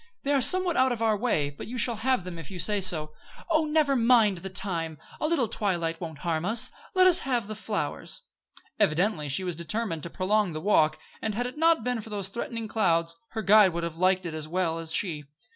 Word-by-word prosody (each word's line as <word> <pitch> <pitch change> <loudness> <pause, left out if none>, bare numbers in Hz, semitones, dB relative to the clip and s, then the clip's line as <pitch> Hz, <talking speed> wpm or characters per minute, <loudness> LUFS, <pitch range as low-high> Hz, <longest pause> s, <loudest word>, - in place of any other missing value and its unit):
They 285 - 0
are 275 - +3
somewhat 370 +3 +6
out 260 0 +3
of 230 -2 -2
our 220 -1 +2
way; 195 -10 0
but 140 - -10
you 250 +3 -6
shall 235 -1 +2
have 255 -1 0
them, 175 -2 -7
if 160 - -9
you 190 - -8
say 200 +4 +1
so." 155 -5 +2 0.4
"Oh! 315 -1 +3
never 300 -2 +2
mind 230 -6 +4
the 190 - -6
time. 170 -4 -3 0.2
A 305 - 0
little 305 -8 +1
twilight 170 -6 -2
won't 160 -3 -6
harm 165 -2 -2
us. 230 +6 +2 0.2
Let's 370 -1 +6
have 245 -6 -1
the 215 - -5
flowers." 215 - -4 0.6
Evidently 175 -4 +1
she 145 +7 -2
was 180 -2 -3
determined 170 +1 -3
to 170 - -5
prolong 195 +1 0
the 155 - -4
walk, 155 -4 +2 0.2
and, 215 -2 -3
had 245 +2 -1
it 250 - -6
not 330 -5 +3
been 245 -1 -2
for 220 - -11
those 200 -3 -4
threatening 230 +1 -5
clouds, 170 -6 +1 0.2
her 220 -1 -3
guide 205 -2 +6
would 170 0 -3
have 165 -1 -5
liked 185 +1 +2
it 165 - -5
as 155 -1 -5
well 165 -1 -1
as 165 -1 -2
she. 160 -4 -2
200 Hz, 225 wpm, -27 LUFS, 165-235 Hz, 0.6 s, somewhat